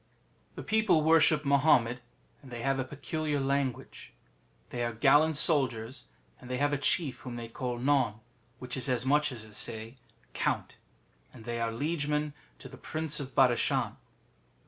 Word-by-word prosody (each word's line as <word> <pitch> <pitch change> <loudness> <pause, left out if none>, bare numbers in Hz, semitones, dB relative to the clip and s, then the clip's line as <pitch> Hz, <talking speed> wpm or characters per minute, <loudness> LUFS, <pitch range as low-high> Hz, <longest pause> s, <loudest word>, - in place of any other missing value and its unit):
The - - -7
people 215 -8 +2
worship 155 -1 +4
Mahommet, 135 -4 +3 0.4
and 135 - -14
they 120 -1 -6
have 135 0 +1
a - - 0
peculiar 145 +2 -3
language. 135 -2 -3 0.6
They 120 -1 -2
are 120 -1 -2
gallant 150 +7 +4
soldiers, 130 -6 +1 0.3
and 125 - -12
they 125 - -2
have 145 +2 +1
a - - +1
chief 145 -1 0
whom 125 -2 -7
they 120 -1 -6
call 125 0 -4
None, 130 -4 +2 0.4
which 125 0 -6
is 130 0 -1
as 125 -1 0
much 150 +2 +2
as 115 -4 -7
to 110 - -13
say 110 +4 -4 0.4
Count, - - -2 0.5
and 115 -3 -14
they 120 -1 -3
are 115 0 0
liegemen 150 +3 -1 0.2
to - - -11
the - - -12
Prince 155 -1 -2
of 135 -2 -7
Badashan. 125 -3 +2
135 Hz, 165 wpm, -30 LUFS, 120-150 Hz, 0.6 s, worship